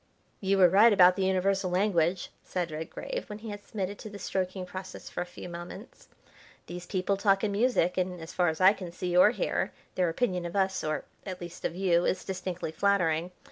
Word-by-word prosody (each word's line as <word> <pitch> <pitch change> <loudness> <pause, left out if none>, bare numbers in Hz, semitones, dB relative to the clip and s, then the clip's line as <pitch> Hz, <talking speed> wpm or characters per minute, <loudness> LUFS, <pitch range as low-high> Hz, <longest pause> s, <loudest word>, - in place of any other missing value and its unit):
"You 195 0 +1
were 185 -2 +8
right 205 +6 +6
about 180 -3 +7
the 195 - 0
universal 190 0 +1
language," 180 -2 +1
said 175 -3 -3
Redgrave, 165 - -5
when 210 - -6
he 215 0 -7
had 205 0 -8
submitted 200 -2 -4
to 215 - -8
the 205 - -9
stroking 185 -1 -3
process 185 +1 -8
for - - -3
a 175 - -4
few 180 - -9
moments. 175 +6 -9 0.6
"These 175 0 -8
people 195 0 0
talk 195 -1 +2
in 210 - +1
music, 200 -5 +2
and, 180 -1 -2
as 160 +1 -9
far 180 - +2
as 160 0 -1
I 190 +2 +7
can 185 -5 -8
see 180 0 -3
or 180 +3 +8
hear, 375 - -1 0.2
their 180 -2 +1
opinion 180 -1 -1
of 170 - -8
us, 190 -1 +1
or, 155 0 -2 0.2
at 185 -2 -6
least, 175 -1 -8
of - - -2
you, 175 -2 +2
is - - -1
distinctly 185 -3 -4
flattering. 170 -2 +1
185 Hz, 210 wpm, -29 LUFS, 175-200 Hz, 0.6 s, were